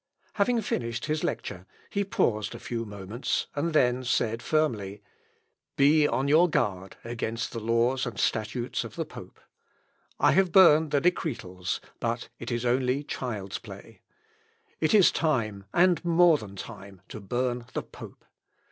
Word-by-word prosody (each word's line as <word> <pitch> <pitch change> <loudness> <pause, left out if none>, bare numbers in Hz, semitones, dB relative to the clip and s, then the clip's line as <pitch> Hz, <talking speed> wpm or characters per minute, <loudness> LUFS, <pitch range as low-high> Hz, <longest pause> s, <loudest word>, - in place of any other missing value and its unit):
Having 230 +3 +2
finished 115 - -3
his 155 0 -1
lecture, 90 +1 -4 0.2
he 200 - 0
paused 110 - 0
a - - -8
few 115 -1 -4
moments, 105 +3 -3
and 160 +4 -1
then 125 -4 +2
said 115 -2 0
firmly, 105 -11 -1 0.7
"Be 145 +2 +5
on 135 0 0
your 160 +5 +5
guard 95 - -1
against 115 -1 -3
the 115 - -4
laws 115 +4 +1
and 120 - -6
statutes 110 +3 -1
of - - -9
the - - -2
pope. - - -12 0.8
I - - +5
have 190 -1 +3
burned 160 -4 +6
the 140 -1 +1
Decretals, 115 - -2 0.2
but 115 0 -2
it 115 - -6
is 120 +1 -2
only 125 +3 +1
child's 110 -9 -4
play. - - -12 0.8
It 160 +6 +3
is 200 -4 +7
time, 110 -11 -1
and 180 0 +3
more 170 -2 +5
than 100 -2 -10
time, 100 -3 -10
to - - -7
burn 120 +4 -2
the - - -2
pope. - - -13
120 Hz, 150 wpm, -27 LUFS, 110-155 Hz, 0.8 s, is